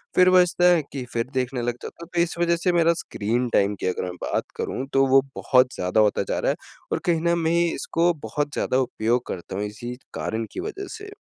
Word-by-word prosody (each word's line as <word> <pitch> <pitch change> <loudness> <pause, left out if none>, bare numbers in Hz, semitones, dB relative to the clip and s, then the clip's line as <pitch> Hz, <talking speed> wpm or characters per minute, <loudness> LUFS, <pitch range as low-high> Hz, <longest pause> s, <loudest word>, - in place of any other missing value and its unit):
फिर 185 0 +6
बजता 180 -1 +4
है 165 - +3
कि 135 - -3
फिर 115 0 -1
देखने 130 -1 -1
लग 120 0 -1
जाता 170 - -8
हूँ। 170 - -12
तो 170 - +4
इस 170 0 -1
वजह 170 0 +3
से 180 - +3
मेरा 170 0 +4
स्क्रीन 120 +4 -1
टाइम 100 +1 +3
की - - 0
अगर 90 - -1
मैं 90 - -5
बात - - 0
करूँ, 130 - -3
तो 135 0 +5
वो 135 +1 +6
बहुत 125 -1 +3
ज़्यादा 90 +4 +2
होता 105 -1 +2
जा - - 0
रहा - - +1
है, - - -2 0.4
और - - +1
कहीं 170 -2 +2
ना 170 +1 +2
मैं 165 0 +1
इसको 170 +1 +1
बहुत 145 +6 -2
ज़्यादा 130 - 0
उपयोग 120 -1 0
करता 90 +1 -6
हूँ, 100 - -1
इसी 115 +4 -6 0.2
कारण 110 +1 -2
की - - -5
वजह 395 -1 -5
से। 415 -1 -10
135 Hz, 235 wpm, -24 LUFS, 115-170 Hz, 0.4 s, फिर